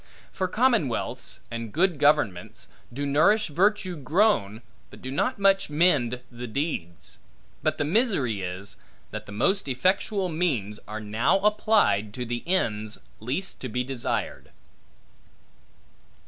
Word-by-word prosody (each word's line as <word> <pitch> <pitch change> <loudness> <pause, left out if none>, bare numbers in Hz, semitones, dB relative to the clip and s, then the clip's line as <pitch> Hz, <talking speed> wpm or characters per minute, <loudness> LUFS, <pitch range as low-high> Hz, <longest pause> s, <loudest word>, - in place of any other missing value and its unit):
For 185 - -1
commonwealths, 220 - 0
and 115 -1 -5
good 170 - +1
governments, 145 -12 +1 0.2
do 140 +4 -3
nourish 175 +10 +3
virtue 185 +3 +1
grown 145 - +1 0.3
but - - -13
do 130 - -6
not 220 - 0
much 195 -2 +3
mend 145 -7 +2
the 120 0 -7
deeds. 110 - -4 0.4
But - - 0
the 145 - 0
misery 155 - +1
is, 90 +2 -6 0.3
that 110 0 -6
the - - -9
most 180 - +1
effectual 185 - +1
means, 140 - -1
are 110 +1 -5
now 110 - +2
applied 205 - +2
to 125 - -3
the 120 0 -3
ends, 110 - 0 0.2
least 135 - -3
to 130 - -4
be 125 +3 -1
desired. 130 -2 -3
140 Hz, 130 wpm, -26 LUFS, -, 0.4 s, nourish